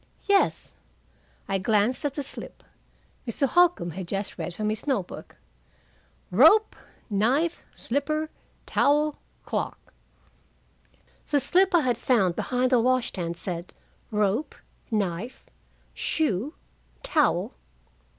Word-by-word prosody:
"Yes." 400 -1 +2 0.7
I 195 0 0
glanced 215 +7 +2
at 285 - -1
the 285 - -2
slip. - - -9 0.6
Mr. 255 +4 +1
Holcombe 350 - +3
had 180 +2 -6
just 195 +3 -3
read - - -4
from 210 +4 -2
his 215 - -5
note 255 -10 +1
book: - - -11 1.0
"Rope, 325 - +6 0.3
knife, 255 +11 +1
slipper, 305 +4 -2 0.3
towel, 295 +1 +2 0.3
clock." - - -4 1.4
The 290 - +3
slip 360 +7 +3
I 340 - +5
had 245 -4 0
found 195 -10 +2
behind 255 0 0
the 250 - +5
wash 255 +1 +2
stand 170 -2 -4
said 175 -1 -5 0.3
"Rope, 210 +6 0 0.3
knife, 210 +1 -2 0.5
shoe, 280 - -1 0.5
towel. - - +1
245 Hz, 110 wpm, -26 LUFS, 200-295 Hz, 1.4 s, Rope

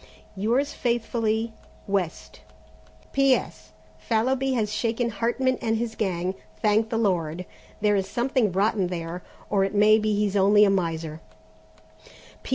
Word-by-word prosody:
"Yours 240 +9 0
faithfully, 230 -2 -1 0.3
"West. 195 -4 -3 0.7
"P.S. 255 - +1 0.3
Fallowby 255 - 0
has 215 -4 -1
shaken 230 +2 -1
Hartman 240 +5 0
and 225 -1 0
his 230 0 -3
gang, 185 -4 -1 0.3
thank 220 +1 +2
the 225 - -1
Lord! 180 -5 0 0.4
There 210 -1 +3
is 195 -1 -1
something 245 -3 +1
rotten 195 0 +1
there, 175 0 -5 0.3
or 200 -2 +3
it 195 +2 -2
may 215 +1 +6
be 215 -1 0
he's 205 -1 0
only 205 +2 +5
a 200 - +3
miser. 165 -4 -2
210 Hz, 130 wpm, -25 LUFS, 190-230 Hz, 0.7 s, may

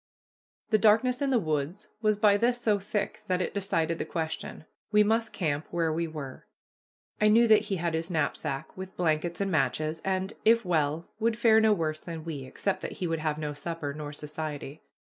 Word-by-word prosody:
The 215 - +5
darkness 225 +5 +4
in 280 - +1
the 260 - +3
woods 155 -1 -2
was 215 -2 +2
by 210 -1 +5
this 240 +3 +2
so 215 -4 +2
thick 205 +1 -3
that 180 -1 +1
it 180 - -2
decided 165 -5 0
the - - 0
question. 160 -1 -4 0.3
We 210 0 +6
must 225 +1 +1
camp 150 -5 -2
where 165 -2 0
we 165 +1 -1
were. 145 -5 -8 0.7
I 210 - +6
knew 230 +2 +6
that 215 -1 +5
he 200 - -1
had 170 -2 -1
his 165 +2 -2
knapsack, 155 -3 -2
with 190 0 -8
blankets 165 +1 0
and 195 -1 0
matches, 155 +1 0
and, 190 +1 -1
if 230 0 +4
well, 160 -2 0
would 225 0 +1
fare 225 -2 +5
no 220 0 +5
worse 155 -6 0
than 165 -1 -7
we, 145 -5 -5
except 195 +8 -2
that - - -5
he 185 - -4
would 165 -1 -1
have 155 -1 -1
no 150 -1 -3
supper 145 -1 -4
nor 150 0 -6
society. 150 0 -6
170 Hz, 195 wpm, -28 LUFS, 155-210 Hz, 0.7 s, We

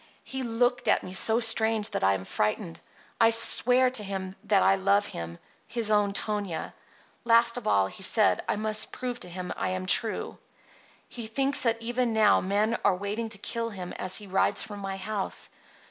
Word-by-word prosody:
He 265 0 -6
looked 245 0 0
at - - +3
me 185 - -8
so 220 +4 +3
strange 225 -2 +1
that - - -3
I 95 0 +3
am 95 -1 -7
frightened. 100 -6 -3 0.4
I 225 - +5
swear 250 +2 +5
to 230 -5 -2
him 190 -1 -5
that 200 -3 +3
I - - +4
love 200 +2 +2
him, 85 0 -7 0.3
his 230 -2 -1
own 205 -1 +2
Tonia. 200 -5 -3 0.5
Last 235 0 +3
of 245 -3 -6
all 100 - +3
he 95 - -9
said 210 +3 +3
I - - +1
must 215 0 -1
prove 250 -1 -5
to 180 - -9
him 180 +1 -6
I - - -2
am 185 0 -3
true. 220 +4 +1 0.7
He 235 -3 -7
thinks 270 +5 -1
that 230 -2 +1
even 240 0 -1
now 215 -1 +4
men 210 +4 0
are 200 - +3
waiting 205 +4 -4
to 215 - -4
kill 230 +3 -3
him 185 -4 -8
as 185 0 +1
he 210 - -2
rides 195 +1 +2
from 205 -1 -8
my 195 -1 -5
house. 200 0 -4
210 Hz, 190 wpm, -27 LUFS, 190-230 Hz, 0.7 s, I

